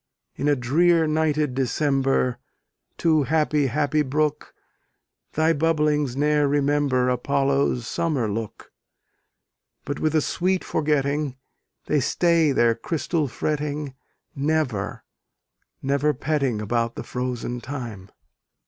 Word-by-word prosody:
In 140 - -2
a 145 - +4
drear 165 +7 +3
nighted 155 -2 +1
December, 135 -1 +1 0.6
Too 160 -2 +3
happy, 150 0 +1
happy 145 +3 +1
brook, 150 +2 -1 0.8
Thy 160 +1 +3
bubblings 150 -4 +1
ne'er 150 0 +2
remember 140 -2 +1
Apollo's 135 0 +1
summer 140 -1 -1
look; 105 +1 -5 1.1
But 145 - -4
with 155 0 0
a - - +5
sweet 185 +4 0
forgetting, 145 -2 0 0.5
They 150 - +2
stay 165 +3 +2
their 120 -3 +3
crystal 155 +5 -2
fretting, 145 +1 -3 0.4
Never, 140 -8 -1 0.8
never 140 +2 +1
petting 135 -6 -1
About 115 +2 -1
the - - -5
frozen 125 -1 -4
time. 115 -9 -7
145 Hz, 105 wpm, -24 LUFS, 125-155 Hz, 1.1 s, a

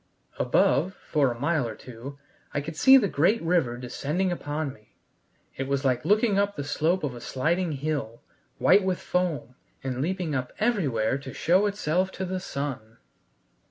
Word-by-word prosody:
Above, 180 +7 +2
for 140 -5 0
a 120 - -7
mile 145 -2 +1
or 110 - -6
two, 125 +5 -10 0.4
I 145 - +1
could 155 +2 -7
see 265 +11 +8
the 220 -6 +3
great 185 +8 +2
river 165 -8 +1
descending 150 +9 -2
upon 150 -4 -3
me: 105 -3 -23 0.6
it 135 - -3
was 140 0 -1
like 130 -2 +1
looking 210 -1 +3
up 200 0 +1
the 145 - -4
slope 160 +5 0
of 140 -4 -2
a 120 - -9
sliding 165 +7 0
hill, 140 -6 -3 0.3
white 205 - +5
with 185 -1 0
foam, 165 -9 -2 0.3
and 130 -1 -2
leaping 175 0 -1
up 130 -2 -2
everywhere 140 - +1
to 140 - -9
show 185 +5 +3
itself 185 -2 0
to 190 - -3
the 185 0 -3
sun. 140 -10 -5
150 Hz, 170 wpm, -26 LUFS, 130-185 Hz, 0.6 s, see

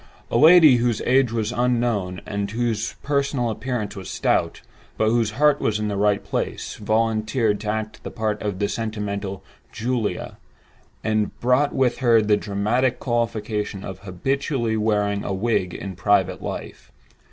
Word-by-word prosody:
A - - +2
lady 155 -4 +8
whose 120 -2 +1
age 130 -2 +3
was 110 -1 -1
unknown, 120 -7 0
and 100 -1 -3
whose 115 0 -2
personal 140 -4 0
appearance 115 -2 -3
was 95 -2 -7
stout—but 110 - -1
whose 115 -2 +2
heart 150 0 +4
was 105 - +1
in 105 0 -2
the 100 - -2
right 100 0 +2
place—volunteered 110 0 -1
to 105 0 -4
act 110 0 -3
the - - -6
part 110 -2 -2
of 100 -3 -2
the 100 +1 0
sentimental 105 -3 -4 0.3
"Julia," 120 -2 -3 0.6
and 110 -1 -1
brought 125 +4 +2
with 125 -2 +1
her 120 -3 +5
the 105 -1 +3
dramatic 110 +5 0
qualification 110 -4 -2
of 95 - -7
habitually 115 - -1
wearing 105 -2 0
a 100 - -2
wig 95 -3 0
in 95 -2 -6
private 100 +2 +1
life. - - -7
110 Hz, 145 wpm, -23 LUFS, 105-120 Hz, 0.6 s, lady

